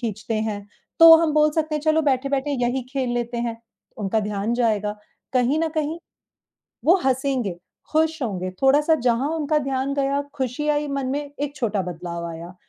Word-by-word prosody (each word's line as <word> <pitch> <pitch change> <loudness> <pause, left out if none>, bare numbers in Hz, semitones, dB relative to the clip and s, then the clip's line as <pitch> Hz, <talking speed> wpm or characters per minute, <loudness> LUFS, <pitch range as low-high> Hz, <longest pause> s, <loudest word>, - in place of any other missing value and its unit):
खींचते 225 -1 -3
हैं, 205 -1 -5 0.3
तो 330 0 +11
हम 320 -2 +1
बोल 305 0 +4
सकते 310 -1 0
हैं 300 - -1
चलो 315 0 +3
बैठे-बैठे 275 0 0
यही 250 +2 0
खेल 260 -3 -1
लेते 240 0 -2
हैं। 230 -1 -3 0.4
उनका 215 +1 0
ध्यान 210 +2 -2
जाएगा, 210 -3 0 0.4
कहीं 255 +4 +2
न 330 - +1
कहीं 310 +2 -1 0.9
वो 345 +4 +6
हँसेंगे, 260 -6 0 0.4
खुश 315 -1 +1
होंगे 185 -5 -3
थोड़ा-सा 295 +4 +4
जहाँ 245 +4 +2
उनका 305 -1 +1
ध्यान 270 0 -2
गया, 280 0 0
खुशी 265 +2 -2
आई 295 0 +1
मन 275 -2 -2
में 285 +2 -1 0.2
एक 290 0 -3
छोटा 210 -5 -1
बदलाव 170 -1 -5
आया 170 +2 -9
265 Hz, 170 wpm, -23 LUFS, 220-295 Hz, 0.9 s, तो